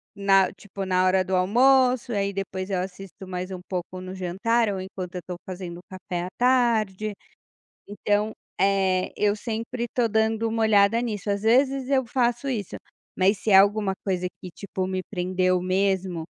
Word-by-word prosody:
na 195 -1 +3
tipo, 195 0 -7
na 185 0 +2
hora 185 0 +3
do 185 0 -1
almoço 250 +5 +3
e 220 - -1
aí 200 0 0
depois 190 0 -4
eu 185 - 0
assisto 190 +1 -8
mais 185 0 -5
um 185 - -5
pouco 185 0 -4
no 185 +1 -7
jantar 205 +5 0
ou 195 - -3
enquanto 185 -1 -7
eu 180 - -4
tô 180 - -4
fazendo 180 -2 -7
o 180 - -16
café 180 -1 -4
à - - -6
tarde, 225 -5 +2 0.8
então, 205 +1 0 0.3
eh, 190 -1 +2
eu 210 0 +2
sempre 230 +2 -4
estou 240 0 0
dando 220 +1 +1
uma 225 0 -1
olhada 210 0 +4
nisso. 210 -4 -4
Às 200 0 -1
vezes, 260 +3 +2
eu 265 -1 +3
faço 240 +2 0
isso, 220 -8 -3 0.4
mas 195 +2 +3
se 215 - -2
é 190 - +8
alguma 200 0 +4
coisa 185 -2 -1 0.2
que 180 - -7
tipo, 190 +1 -4
me 185 0 -2
prendeu 185 -1 0
mesmo, 185 -2 0
195 Hz, 180 wpm, -25 LUFS, 185-225 Hz, 0.8 s, é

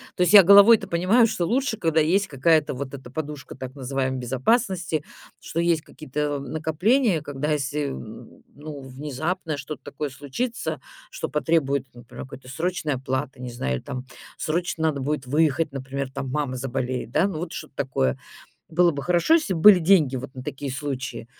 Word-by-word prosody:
то - - -3
есть 180 - +2
я 200 -2 +11
головой-то 200 +4 +7
понимаю, 195 +8 +4
что 180 -5 -1
лучше, 245 +2 0
когда 160 -1 +2
есть 190 +6 +2
какая-то 150 +2 +2
вот 130 +1 -6
эта 130 -3 -9
подушка 150 0 -6
так 130 0 -7
называемой 130 -1 -2
безопасности, 165 - 0 0.4
что 165 - -4
есть 170 -2 +2
какие-то 150 -1 -4
накопления, 160 - +1
когда 145 +1 -3
если, 145 0 -1
н 65 - -9
ну, 145 -1 -9
внезапно 150 +5 -4
что-то 140 0 -7
такое 145 0 -5
случится, 225 - -4 0.3
что - - -5
потребует, 140 -3 +1
например, 120 -1 -10
какой-то 130 -1 -12
срочной 160 -1 -2
оплаты, 130 +1 -3
не 125 -1 -5
знаю, 65 - -2
там, 130 0 -6 0.3
срочно 165 0 -2
надо 140 -3 -1
будет 140 0 -2
выехать, 150 +2 +1
например, 135 0 -4
там, 135 -1 -5
мама 135 -2 -2
заболеет, 125 -1 -3
да, 165 +6 +3
ну, 185 - -4
вот 175 -1 -5
что-то - - -8
такое. 65 - 0 0.5
Было 175 +1 +4
бы 140 -2 -5
хорошо, 180 - +3
если 300 - +2
бы 160 - -3
были 205 +1 +9
деньги 160 -6 +4
вот 130 +2 -7
на 130 - -7
такие 140 +1 -5
случаи. 130 -4 -4
150 Hz, 170 wpm, -24 LUFS, 135-170 Hz, 0.5 s, я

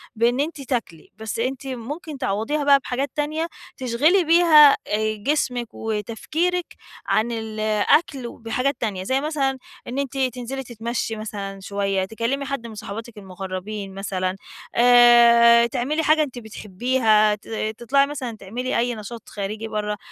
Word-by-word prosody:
بإن 235 +3 +2
أنتِ 295 0 -2
تاكلي، 235 - -4
بس 220 +1 -5
أنتِ 260 +3 -3
ممكن 280 +5 -6
تعوّضيها 255 +8 -1
بقى 280 -1 +6
بحاجات 270 +2 -3
تانية، 310 +2 -1 0.3
تشغِلي 280 +10 +3
بيها 320 -3 +7 0.2
آآ 215 +1 0
جسمِك 250 -5 -1
وتفكيرِك 300 - -2 0.3
عن 235 +2 +1
ال 220 -1 -5 0.3
أكل 280 -6 +2
بحاجات 250 +5 -1
تانية، 200 -5 -2
زي 260 +7 0
مثلًا 280 -3 -1 0.3
إن 255 +3 -3
أنتِ 275 -1 -3
تنزلي 260 0 -2
تتمشي 235 -1 -4
مثلًا 200 -2 -6
شوية، 195 -1 -1
تكلمي 235 +5 -2
حد 265 -3 -4
من 220 - -10
صاحباتِك 220 +2 -8
المقربين 195 +1 -6
مثلًا، 190 -1 -2 0.4
آآ 235 -1 +7
تعملي 285 +7 -1
حاجة 310 0 +4
أنتِ 260 -4 -6
بتحبيها، 220 0 +1
ت 210 - -20 0.3
تطلعي 275 +4 +2
مثلًا 255 -6 -5
تعملي 240 +7 -3
أي 240 +1 0
نشاط 220 +1 -9
خارجي 210 +2 -5
برّه، 210 -1 -3
235 Hz, 140 wpm, -22 LUFS, 215-275 Hz, 0.4 s, بيها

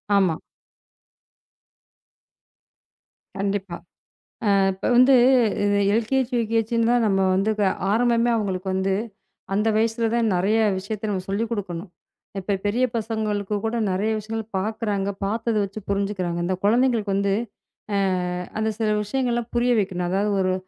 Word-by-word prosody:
ஆமா. 185 -5 +3 3.0
கண்டிப்பா. 195 -2 -2 0.8
அ, - - +4 0.2
இப்ப 190 - -8
வந்து 255 +2 +7 0.5
இந்த 205 0 +2 0.2
எல்கேஜி, 250 +3 0
யூகேஜின்னுதான் 230 +1 +1
நம்ம 195 -2 +2 0.2
வந்து 195 +3 +1 0.4
ஆரம்பமே 235 +1 +2
அவங்களுக்கு 190 -3 -3
வந்து, 190 +1 0 0.6
அந்த 210 +2 +1
வயசுலதான் 225 0 +1
நிறைய 195 +5 +2 0.2
விஷயத்தை 205 +3 -5
நம்ம 190 -3 -2
சொல்லிக் 215 +3 -1
கொடுக்கணும். 185 -4 -4 0.5
இப்ப 195 +1 -1
பெரிய 235 +5 +2
பசங்களுக்கு 215 -2 -2
கூட 225 +1 -1 0.2
நிறைய 195 +4 0
விஷயங்கள் 220 +1 -6
பார்க்கறாங்க, 205 -1 -2 0.2
பார்த்தத 225 +2 -1
வச்சு 200 +2 -6
புரிஞ்சுக்கிறாங்க. 195 -3 -1
இந்த 185 +1 0
குழந்தைகளுக்கு 225 -1 +2
வந்து, 200 0 +1 0.6
அ, - - +2 0.6
அந்த 220 0 +1
சில 220 -1 +1
விஷயங்கலாம் 240 +1 -2
புரிய 240 +1 +2
வைக்கணும். 180 -3 -2
அதாவது 200 +3 0
ஒரு 185 0 +1
210 Hz, 120 wpm, -23 LUFS, 195-230 Hz, 3.0 s, வந்து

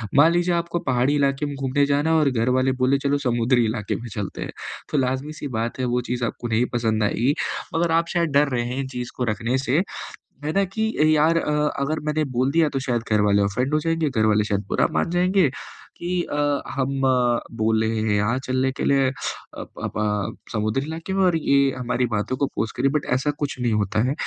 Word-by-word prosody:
मान 150 +4 +7
लीजिए 175 +1 +2
आपको 170 0 -1
पहाड़ी 130 0 +1
इलाके 140 0 +1
में 145 -1 -4
घूमने 135 +1 +1
जाना 145 +2 +1
है - - +4
और 150 -3 +3
घरवाले 130 +2 +2
बोले, 130 +2 +4
"चलो, 140 +1 +1
समुद्री 120 -2 +2
इलाके 110 -2 -2
में 120 - -6
चलते 100 -3 -5
हैं।" - - -4 0.4
तो 150 - +1
लाज़मी-सी 135 +4 -2
बात 115 +3 -3
है, 130 - 0
वो 125 0 0
चीज़ 125 0 -2
आपको 120 - -4
नहीं 115 +2 +2
पसंद 110 -2 +1
आएगी। 120 +6 +1 0.4
मगर 165 0 +1
आप 165 +1 +2
शायद 170 -3 +1
डर 145 0 +4
रहे 120 -3 0
हैं 125 +2 -3
इन 135 - -4
चीज़ 125 -2 -5
को 125 - -1
रखने 115 +5 -1
से, 135 +5 +1 0.6
है 155 - -1
ना, 195 +2 +2
कि 220 +4 -2 0.2
यार 160 +3 +4
अ, 150 - -1 0.3
अगर 155 +3 -1
मैंने 155 0 0
बोल 130 +2 +2
दिया, 165 -1 +3
तो 135 - -2
शायद 120 -2 +1
घरवाले 105 -1 +3
ऑफेन्ड 125 +9 0
हो 155 - +3
जाएँगे, 165 -1 0
घरवाले 110 -4 +2
शायद 100 -1 -1
बुरा - - +2
मान - - 0
जाएँगे 180 -2 +3 0.5
कि 175 +1 -1
अ, 145 -2 -1
"हम 135 +1 -2 0.6
बोल 110 0 +2
रहे 110 0 0
हैं 110 -1 +1
यहाँ 105 +5 +1
चलने 130 +1 +1
के - - -4
लिए 135 -1 +3 0.5
अप - - -7
अप - - -4
अ, 105 -1 -2
समुद्री 110 +4 0
इलाके 160 +4 -5
में 195 - +2
और 180 -2 +3
ये 140 -3 +3
हमारी 125 0 0
बातों 105 +5 -1
को - - +1
ऑपोज़ 115 -4 -3
कर - - -2
रही 135 - +4
है।" - - -5
बट - - -9
ऐसा 135 +3 0
कुछ 145 -3 -2
नहीं 120 -2 +1
होता 105 0 0
है। - - +1
130 Hz, 225 wpm, -23 LUFS, 115-150 Hz, 0.6 s, मान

